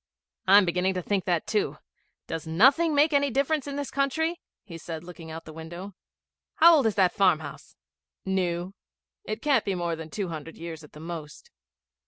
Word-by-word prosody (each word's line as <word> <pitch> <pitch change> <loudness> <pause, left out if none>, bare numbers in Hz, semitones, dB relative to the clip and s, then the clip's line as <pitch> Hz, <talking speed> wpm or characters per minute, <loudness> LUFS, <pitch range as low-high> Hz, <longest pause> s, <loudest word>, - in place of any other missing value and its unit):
'I'm 200 +1 +7
beginning 180 +2 0
to 180 - -2
think 200 0 -1
that 175 -3 0
too. 210 -2 -1 0.5
Does 165 -1 -5
nothing 270 - +4
make 295 +2 +4
any 285 0 +3
difference 280 +3 0
in 280 - -4
this 285 -1 -4
country?' 315 +5 0 0.2
he 175 -5 -10
said, 165 -1 -7
looking 170 -2 -10
out 160 +1 -7
of - - -43
the 155 - -10
window. 170 +5 -8 0.6
'How 335 0 +8
old 270 -6 +3
is 215 - 0
that 185 -3 +3
farmhouse?' 180 -7 0 0.5
'New. 185 -1 -1 0.5
It 215 +1 -5
can't 275 -6 +3
be 195 - -1
more 170 -1 -1
than 160 0 -8
two 195 +1 -3
hundred 160 0 -7
years 165 -1 -7
at 150 - -15
the 150 - -11
most.' 160 -2 -8
185 Hz, 190 wpm, -27 LUFS, 165-265 Hz, 0.6 s, How